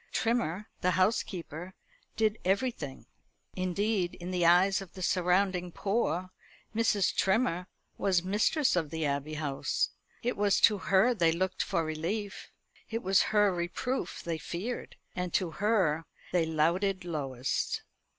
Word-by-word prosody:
Trimmer, 220 -5 0 0.2
the 180 -2 +2
housekeeper, 185 - -1 0.4
did 215 0 +1
everything. 190 - -1 0.5
Indeed, 185 0 0
in 175 +1 -6
the 175 -2 +2
eyes 190 +3 +5
of 195 - -10
the 185 - -6
surrounding 180 0 +1
poor, 185 -3 -1 0.4
Mrs. 215 -4 +2
Trimmer 190 -3 +1 0.3
was 185 -3 +2
mistress 210 - +2
of 165 -4 0
the 160 0 -2
Abbey 140 +2 -2
House. 145 -3 -1 0.3
It 245 +1 0
was 205 -1 +3
to 210 -3 +5
her 195 +6 +4
they 170 -7 +3
looked 185 +3 -1
for 170 -4 0
relief; 180 +7 -3 0.4
it 230 +1 -3
was 190 +1 +4
her 210 -2 +4
reproof 175 +9 -3
they 165 -2 -3
feared; 205 +11 -5 0.2
and 180 -1 -2
to 180 -3 +1
her 185 -6 +1 0.2
they 170 -3 +2
louted 175 +5 +1
lowest. 135 -6 -2
185 Hz, 135 wpm, -30 LUFS, 170-205 Hz, 0.5 s, eyes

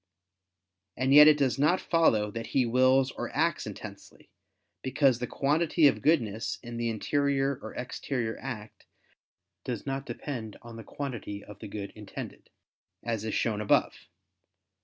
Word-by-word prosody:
And 130 +2 +2
yet 150 +1 +10
it 155 -1 +7
does 135 -2 +1
not 155 +6 +3
follow 110 -12 +2
that 115 +1 -5
he 130 - +4
wills 130 +2 +3
or - - -5
acts - - +1
intensely; - - -10 0.5
because 130 -1 +2
the 125 - -3
quantity 155 +5 +2
of 140 - +4
goodness 115 -9 +1
in 120 -1 -7
the 120 0 -1
interior 140 +3 0
or - - -8
exterior 125 -2 -3
act 115 -5 -8 0.8
does 120 -4 -4
not 135 0 -3
depend 115 -7 -6
on 115 -1 -10
the 115 - -8
quantity 120 -8 -6
of 105 -1 -12
the - - -8
good 100 -1 -6
intended, 105 -2 -9 0.5
as 115 -3 -2
is 110 - -2
shown 105 -2 0
above. 105 - +3
125 Hz, 150 wpm, -28 LUFS, 110-140 Hz, 0.8 s, yet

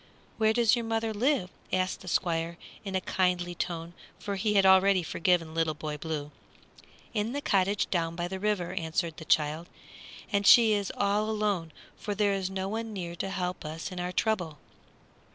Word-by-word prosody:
"Where 220 0 +4
does 235 0 +4
your 235 - -2
mother 225 0 -1
live?" 235 -4 +1 0.2
asked 185 0 0
the 185 - -12
Squire, 170 -1 0 0.3
in 195 -2 -4
a 190 - +1
kindly 180 -1 0
tone, 170 -1 -4 0.2
for 200 - -4
he 210 +2 0
had 195 -1 +5
already 190 0 +5
forgiven 165 -1 +1
Little 160 -1 0
Boy 150 0 -4
Blue. 150 -1 -4 0.8
"In 220 +2 -1
the 285 - -1
cottage 195 -5 +1
down 165 -2 0
by 175 0 -2
the 190 +1 -5
river," 205 -4 -1
answered 165 0 -2
the 160 - -9
child; 155 +3 +1 0.6
"and 200 0 +2
she 225 -3 +8
is 200 -2 -1
all 205 +2 +1
alone, 205 -6 -1 0.3
for 205 - -4
there 205 -1 +2
is 190 -1 -2
no 190 0 -3
one 220 +2 -4
near 175 -3 -5
to 195 - -3
help 180 -2 -3
us 160 +3 -5
in 180 - -6
our 180 0 -2
trouble." 180 -6 -1
185 Hz, 185 wpm, -29 LUFS, 170-210 Hz, 0.8 s, she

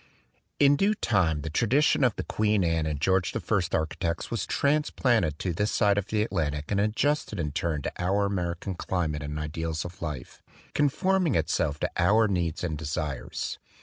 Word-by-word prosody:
In 145 0 +5
due 205 +5 +2
time 90 - +1
the 80 +1 -5
tradition 130 - +3
of 125 -5 +3
the - - -3
Queen 105 -2 +1
Anne 80 -2 +1
and 75 -2 -2
George 95 +2 +1
I - - 0 0.3
architects 85 +1 -1
was 115 - -2
transplanted 125 - +1
to 90 +1 -2
this 105 +5 0
side 100 -1 +3
of 100 - -5
the 105 -1 +1
Atlantic 75 -8 -2
and 100 - +2
adjusted 110 +1 0
in 75 -3 -1
turn 75 -1 -2
to - - -3
our 100 +3 +2
American 90 -1 -2
climate 85 -5 -2
and 75 +1 -4
ideals 80 +2 -3
of 90 +2 -9
life, 75 -6 -6 0.3
con 145 -1 +3
forming 185 - +1
itself 75 -2 0
to - - 0
our 105 +5 +4
needs 85 -5 -1
and 80 -4 -2
desires. 75 -3 -4
90 Hz, 180 wpm, -27 LUFS, 80-110 Hz, 0.3 s, In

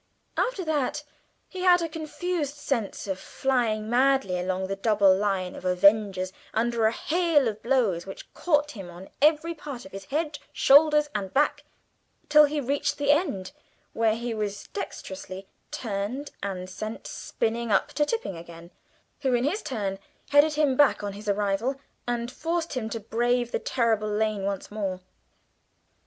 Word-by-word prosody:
After 415 -8 0
that 295 -1 -1 0.4
he 375 - -8
had 360 -1 +6
a - - 0
confused 315 -1 -3
sense 275 -7 -2
of 190 -2 -3
flying 225 -2 0
madly 245 -6 +2
along 185 +1 -1
the 195 +1 -3
double 200 -2 +4
line 190 -2 -1
of - - -10
avengers 190 0 +3 0.2
under 230 0 +2
a - - +2
hail 320 -1 +2
of 215 -1 -3
blows 225 -9 +1
which 195 - -10
caught 295 -3 +1
him 195 -8 -8
on 175 +2 -11
every 315 +3 +4
part 285 -7 -8
of 190 - -12
his 195 0 -8
head, 295 +3 -2
shoulders, 300 +1 +5
and 195 -3 -3
back 290 +1 +2 0.6
till 300 0 +8
he 295 +1 -1
reached 280 +1 -1
the 285 0 +3
end, 290 - 0 0.4
where 225 -1 +2
he 235 0 -3
was 210 -2 -4
dexterously 190 - -6 0.2
turned 225 +6 -4
and 185 -2 -4
sent 215 +4 -6
spinning 230 0 -2
up - - +3
to 300 - +1
Tipping 375 - -2
again, 170 +1 -11 0.5
who 265 -3 +1
in 240 - +1
his 340 +11 0
turn 200 -6 -3 0.3
headed 290 +2 +6
him 295 -3 +2
back 285 -6 +4
on 200 -1 -3
his 205 +1 -6
arrival, 205 +5 0 0.3
and 240 0 -2
forced 330 +4 -2
him 235 -5 -2
to 230 - -4
brave 240 +3 0
the - - 0
terrible 225 -3 +1
lane 210 -1 0
once 200 -1 -3
more. 195 -3 -3
235 Hz, 160 wpm, -26 LUFS, 200-290 Hz, 0.6 s, till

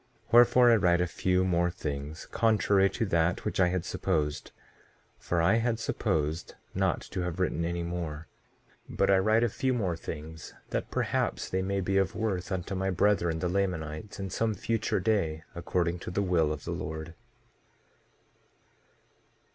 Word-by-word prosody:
1:4 - - -23
Wherefore, 120 +1 +7
I - - +7
write 90 -3 +3
a 90 - +2
few 90 +1 +1
more 85 -1 +2
things, 75 -2 -5
contrary 105 -3 +3
to 115 - -2
that 85 -2 +1
which - - -2
I 90 - +5
had 90 -1 -1
supposed; 75 -1 -1 0.7
for 85 -1 0
I 95 +7 +4
had 115 0 0
supposed 80 -6 -2 0.2
not - - 0
to 95 - -5
have 90 0 -3
written 90 -2 0
any 85 +1 -2
more; 85 -2 -4 0.6
but - - +2
I 95 - +5
write 110 +4 +3
a - - +4
few 130 +3 -1
more 95 -8 0
things, 80 -1 -8 0.2
that - - -2
perhaps - - -1
they 95 - 0
may 100 +1 -1
be 95 +1 0
of 95 -1 0
worth 100 -4 -2
unto 95 +1 -3
my 95 0 -1
brethren, 90 -3 +2
the 90 - -1
Lamanites, 90 -1 -2
in 95 -2 -4
some 110 +2 0
future 115 +1 -1
day, 80 -8 0
according 85 0 -1
to - - -6
the 100 +3 0
will 85 -5 +2
of 75 -2 -5
the - - -3
Lord. 80 +2 -5
90 Hz, 170 wpm, -29 LUFS, 85-100 Hz, 0.7 s, Wherefore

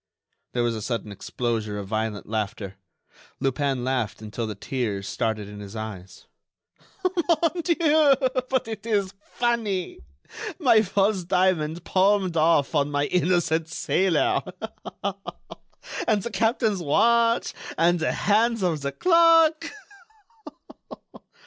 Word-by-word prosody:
There 120 - 0
was 120 -1 0
a 110 - -5
sudden 110 -2 -3
explosion 110 +1 -3
of 100 -1 -5
violent 110 0 -3
laughter. 105 -2 -3 0.7
Lupin 135 -1 -1
laughed 125 -5 -2
until 110 +1 -5
the 105 - -5
tears 100 -3 -3
started 110 -3 -2
in 105 0 -10
his 100 +1 -9
eyes. 105 -4 -8 0.8
"Mon 345 -2 +1
dieu, 310 -4 +4 0.3
but 260 -3 0
it 220 -1 -7
is 200 -3 0
funny! 220 -6 -2 0.6
My 240 -10 +5
false 195 -1 +1
diamond 175 -3 +1
palmed 190 -1 +2
off 155 -2 +3
on 145 -2 +1
my 145 0 0
innocent 175 -2 +1
sailor! 165 +2 +1 1.7
And 210 -4 +2
the 235 - -4
captain's 225 -3 +1
watch! 230 +9 +2 0.2
And 175 +1 +3
the 160 - 0
hands 225 +1 +1
of 165 -5 0
the 140 0 -2
clock!" 330 - +4
170 Hz, 115 wpm, -25 LUFS, -, 1.7 s, My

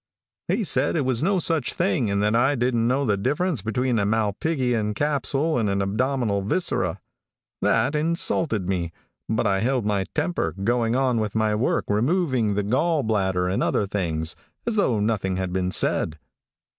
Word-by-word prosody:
"He 225 - 0
said 180 - +2
it 150 -5 0
was 125 -3 +1
no 190 +4 +2
such 165 -6 +1
thing, 160 - +1
and 100 0 0
that 105 +2 +2
I 125 +5 +3
didn't 120 -2 +1
know 135 +3 +1
the 105 -4 +2
difference 145 - -1
between 120 +3 0
a - - +1
malpighian 110 +1 0
capsule 145 +2 0
and 105 -3 0
an 100 0 0
abdominal 110 +1 0
viscera. 110 - -1 0.6
"That - - +2
insulted 155 - 0
me, 90 -3 -1 0.4
but 110 +1 0
I 100 -2 +2
held 125 +1 0
my 100 -2 0
temper, 155 - -1
going 120 +1 +1
on 130 -3 +1
with 105 -1 -3
my 110 -1 +2
work, 110 +4 0
removing 125 - +1
the 105 - 0
gall 145 +8 +1
bladder 95 -4 0
and 95 - -1
other 105 - +1
things, 85 -5 -2 0.3
as 235 -2 -1
though 130 - +2
nothing 105 -3 0
had 95 -1 -3
been 90 -1 0
said. 80 -3 0
115 Hz, 170 wpm, -24 LUFS, 100-140 Hz, 0.6 s, I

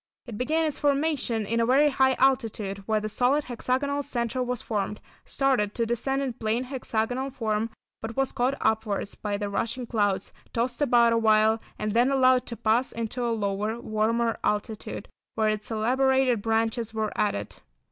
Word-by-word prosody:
It 235 - -7
began 310 +8 +1
its 300 -3 -2
formation 280 -6 +1
in 230 +3 0
a 230 - +3
very 280 +4 +5
high 265 -1 +3
altitude, 225 -7 +1
where 215 -1 +2
the 215 - -3
solid, 250 +7 +2
hexagonal 260 +3 -1
centre 250 -2 -2
was 250 -1 -2
formed, 210 -1 -2 0.3
started 255 -7 +1
to 230 - +1
descend 270 +4 -1
in 260 -3 -2
plain 230 +1 -1
hexagonal 250 0 -2
form, 225 -3 -1 0.3
but 225 +2 -6
was 270 -1 +1
caught 255 +3 0
upwards 220 -2 0
by 205 -1 -3
the 205 0 -3
rushing 230 +5 -2
clouds, 205 -5 0 0.2
tossed 240 +3 -1
about 235 -4 +4
awhile, 220 0 +3 0.2
and 210 -1 -2
then 240 +3 +4
allowed 255 -2 +4
to 235 - -6
pass 230 +3 +1
into 230 +2 -3
a 240 - 0
lower, 210 0 -1
warmer 230 +1 0
altitude 210 +1 -2 0.3
where 220 -1 +2
its 215 -1 -2
elaborated 255 +1 +2
branches 225 +1 0
were 215 -1 -1
added. 205 - -1
230 Hz, 165 wpm, -26 LUFS, 215-260 Hz, 0.3 s, very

